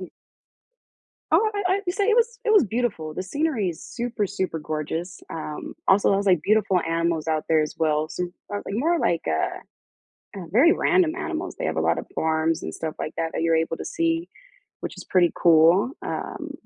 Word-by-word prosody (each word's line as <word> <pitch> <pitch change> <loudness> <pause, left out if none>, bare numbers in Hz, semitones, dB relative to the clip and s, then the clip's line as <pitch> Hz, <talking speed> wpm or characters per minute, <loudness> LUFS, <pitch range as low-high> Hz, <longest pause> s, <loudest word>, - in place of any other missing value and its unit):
And 185 - -8 1.2
Oh, 440 - +4 0.2
I 375 - +3
I'd 355 - -1
say 400 0 +1
it 450 - +4
was 470 0 +2
it 440 - +3
was 415 - +6
beautiful; 210 -9 -2
the 185 - -4
scenery 245 - -1
is 165 - -7
super, 235 -3 -3
super 190 -4 -3
gorgeous. 155 +3 -4
Um, 155 -2 -6
also, 195 +1 +4
I - - +3
was 200 - -1
like 180 -5 +4
beautiful 210 -3 +3
animals 165 -1 -1
out 155 -1 0
there 160 -1 +4
as 150 - -2
well. 155 -1 +1
So 180 - -3 0.3
more 205 0 -3
like 195 - -5
more 330 +9 +1
like 170 - +1
a, 80 0 -3 0.6
uh, - - -7
very 270 - +6
random 360 -4 +2
animals. 355 -1 -4
They - - -2
have - - -2
a - - +1
lot - - +2
of - - -6
farms 160 0 0
and 80 - -5
stuff 160 -1 -4
like - - -4
that, 165 0 -1
that - - -1
you're 165 -1 +3
able 165 0 0
to - - -7
see, 335 +1 -1 0.5
which - - -5
is - - -9
pretty 175 -2 +3
cool. 170 +7 +5
Um, - - -5
185 Hz, 205 wpm, -24 LUFS, -, 1.2 s, was